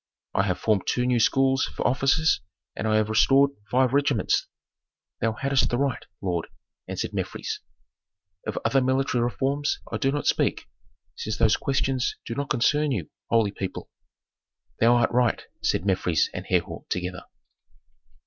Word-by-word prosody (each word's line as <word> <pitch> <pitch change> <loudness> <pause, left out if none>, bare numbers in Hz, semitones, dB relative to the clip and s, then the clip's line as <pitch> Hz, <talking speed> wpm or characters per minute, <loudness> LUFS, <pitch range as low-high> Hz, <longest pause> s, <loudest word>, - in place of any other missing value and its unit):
I - - +3
have 90 - 0
formed 105 -4 0
two 125 - +1
new 125 -1 +2
schools 135 +3 +3
for - - -5
officers 135 +3 +3 0.3
and 110 - -2
I 110 - +2
have 110 -1 +2
restored 135 +5 +4 0.2
five 130 +1 +2
regiments." 140 -5 +2 0.7
"Thou 115 0 +1
hadst 135 +2 +1
the 120 - 0
right, 140 -1 -1 0.2
lord," 90 -3 -1 0.4
answered - - -4
Mefres. - - -3 0.9
"Of - - -3
other 135 +4 +3
military 130 -1 +1
reforms 140 +4 -1
I - - -1
do 135 -2 +1
not 145 +1 -2
speak, - - +1 0.5
since 110 - -4
those 110 -2 +4
questions 135 -2 0
do 115 - -4
not 140 +3 -3
concern 150 +5 +2
you, 95 - -3 0.2
holy 115 -3 +3
people." 95 -2 -6 0.9
"Thou 120 +2 +5
art 120 -1 +2
right," 120 -1 +1 0.2
said 85 - 0
Mefres 90 -4 +1
and - - -6
Herhor - - -1
together. 90 0 -3
125 Hz, 150 wpm, -25 LUFS, 110-135 Hz, 0.9 s, Thou